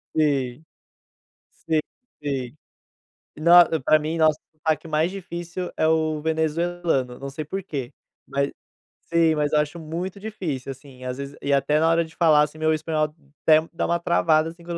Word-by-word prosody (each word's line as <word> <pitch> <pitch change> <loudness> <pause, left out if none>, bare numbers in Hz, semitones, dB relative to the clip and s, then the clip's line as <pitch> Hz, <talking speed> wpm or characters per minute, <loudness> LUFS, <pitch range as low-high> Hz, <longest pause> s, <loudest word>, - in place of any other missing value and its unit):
Sim. 140 -3 0 1.0
Sim, 160 -1 +3 0.4
sim. 135 -1 -3 0.8
Nos 170 +2 +7 0.2
pra 155 - +5
mim, 155 +2 -3
nossa, 155 -1 +4
é 155 - -47
o - - -37
sotaque 155 +1 -1
mais 155 +3 +1
difícil 175 -1 -6
é 155 - +2
o 155 -1 +1
venezuelano, 160 -4 -1
não 140 0 -6
sei 150 +3 -5
porquê, 150 -7 -5 0.3
ma 140 - -2 0.7
sim, 165 -1 +4
mas 150 0 0
eu 150 - +4
acho 150 +3 -3
muito 175 +5 -5
difícil, 175 -11 -4
assim, 130 -1 -14
às 125 0 -3
vezes 140 +1 -7
e 140 - 0
até 150 +2 +3
na 165 - +4
hora 165 0 +3
de 160 - -14
falar, 155 -3 +5
assim, 150 +1 -3
meu 155 0 +2
espanhol 155 0 0 0.4
até 155 -1 +7
dá 170 - -1
uma 170 0 +1
travada, 165 -2 +2
assim, 170 +1 -15
quando 170 0 -4
155 Hz, 175 wpm, -24 LUFS, 150-170 Hz, 1.0 s, Nos